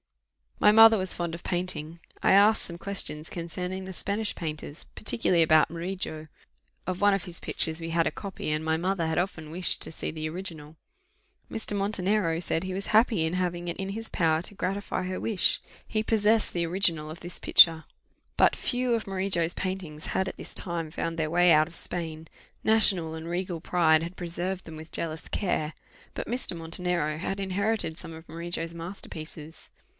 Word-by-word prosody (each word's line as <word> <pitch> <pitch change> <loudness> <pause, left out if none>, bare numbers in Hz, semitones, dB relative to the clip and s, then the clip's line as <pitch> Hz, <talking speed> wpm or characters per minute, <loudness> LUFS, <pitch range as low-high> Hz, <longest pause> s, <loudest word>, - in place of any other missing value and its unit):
My 210 - +6
mother 225 +1 +8
was 185 -1 0
fond 170 -1 -3
of 170 - -7
painting: 170 -2 -3 0.2
I - - +4
asked 210 +3 +5
some 170 - -6
questions 170 -5 0
concerning 180 +2 -4
the 190 - -7
Spanish 205 +4 -1
painters, 155 -2 -5
particularly 185 -6 +1
about 155 -1 +5
Murillo; 170 -2 -4 0.6
of 185 +1 -3
one 205 0 +5
of 195 - -3
his 175 -2 -1
pictures 160 +1 0
we 165 - -4
had 165 0 +2
a - - +1
copy, 195 -6 -6
and 155 +1 -1
my 160 0 +1
mother 180 0 0
had 160 - -1
often 175 -4 -3
wished 180 +1 0
to - - 0
see - - -4
the 155 0 -4
original. 160 -3 -7 0.8
Mr. 220 -2 0
Montenero 200 -3 +1
said 165 0 -1
he 185 0 -4
was 195 - -3
happy 215 -6 +4
in 160 - -2
having 175 -1 -2
it 170 - -3
in 195 0 -4
his 225 +3 -3
power 160 -2 +2
to 205 - -5
gratify 190 0 -2
her 185 0 -3
wish; 210 -5 +2 0.3
he 215 -1 -1
possessed 220 0 +2
the 170 -1 0
original 165 -3 +1
of 160 - -9
this 175 0 -6
picture. 160 -2 +6 0.5
But - - +5
few 250 -1 0
of 225 -3 -1
Murillo's 185 -3 0
paintings 185 -5 -4
had 190 - 0
at - - -6
this - - -9
time 170 -4 -3
found 165 +1 -3
their 155 -1 0
way 175 +1 +5
out 155 0 +5
of 170 - -10
Spain; 160 -2 -5 0.4
national 195 -7 +4
and 160 +1 -7
regal 175 -1 -3
pride 160 -3 +3
had 170 +2 -7
preserved 180 +2 -3
them 160 - -9
with 160 +1 -10
jealous 160 -1 -3
care; 160 -6 -1 0.4
but - - -5
Mr. 245 -6 +1
Montenero 165 -2 -1
had 195 +3 -3
inherited 200 -2 -1
some 165 - -8
of 160 +1 -12
Murillo's 170 0 -4
master 170 +4 -8
pieces. 155 0 -9
175 Hz, 190 wpm, -27 LUFS, 160-195 Hz, 0.8 s, mother